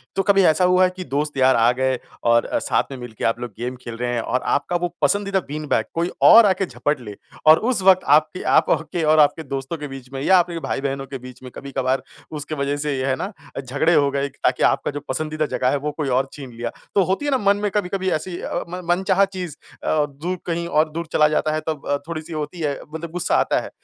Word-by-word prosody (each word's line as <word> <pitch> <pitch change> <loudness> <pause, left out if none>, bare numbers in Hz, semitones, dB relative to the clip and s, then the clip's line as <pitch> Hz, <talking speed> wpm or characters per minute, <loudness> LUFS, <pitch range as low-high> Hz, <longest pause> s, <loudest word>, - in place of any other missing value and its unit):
तो 195 - +1
कभी 200 -1 +4
ऐसा 170 +2 +4
हुआ 180 +1 +4
है 185 - +4
कि 185 - -5
दोस्त-यार 140 -3 +1
आ 115 +1 +4
गए 130 0 0 0.2
और 115 0 +3
अ, - - -1
साथ - - +1
में 135 - -6
मिलके 120 -3 -9
आप 115 +1 +1
लोग 120 -2 -5
गेम 125 +2 -4
खेल 120 -2 -7
रहे 120 0 -2
हैं, 120 - 0
और 130 - -1
आपका 175 +5 0
वो 175 0 0
पसंदीदा 195 +6 +2
बीन 150 +2 -5
बैग - - +1
कोई 170 +2 -1
और 230 -1 +9
आ 200 - +5
के 190 +1 -2
झपट 150 -4 -2
ले, 105 -4 -9 0.3
और 155 +1 +8
उस 230 -4 0
वक़्त 185 -1 +6 0.2
आपके 155 +3 -3 0.2
आप - - +3
औ - - +5 0.2
के 170 -2 0
और 155 0 +4
आपके 150 +2 +3
दोस्तों 135 +3 -4
के 150 -1 -6
बीच 135 -2 -10
में, 135 - -4
या 185 +5 +5
आपके 170 -1 0
भाई-बहनों 135 -1 -3
के 135 - -7
बीच 125 0 -12
में 125 - -9
कभी-कभार 135 -1 -2 0.3
उसके 155 0 -5
वजह 140 +1 -1
से 145 -1 -2
ये 130 - -1
है 130 -1 +1
ना 195 - -4 0.2
अ, - - -3
झगड़े 145 +6 +1
हो 140 -2 +4
गए 140 0 -1
ताकि - - -1
आपका - - +2
जो 145 - -5
पसंदीदा 155 +3 -1
जगह 125 - +1
है, 145 - +1
वो 150 +2 -3
कोई 145 -2 -3
और 130 +2 +1
छीन 135 -4 -9
लिया? 120 +1 -4 0.3
तो 195 - +5
होती 190 +11 -1
है 290 - 0
ना 265 - +3
मन 200 -3 +2
में 205 0 -1
कभी-कभी 190 -1 -1
ऐसी 175 +3 -3
अ - - -5
अ, 175 - -2
मन 180 +1 -5
मनचाहा 190 +2 +3
चीज़ 185 -5 -6 0.3
अ, 150 -1 +2
दूर 150 +6 -5
कहीं 170 0 -2
और 155 -1 +2
दूर 165 +2 -4
चला 150 -1 +5
जाता 155 0 0
है, 155 - 0
तब 145 -2 -2
थोड़ी-सी 160 0 -6
होती 155 +3 -5
है, 145 -3 -2
मतलब 160 0 -6
गुस्सा 180 +1 0
आता - - +2
है। - - -8
150 Hz, 255 wpm, -21 LUFS, 135-175 Hz, 0.3 s, और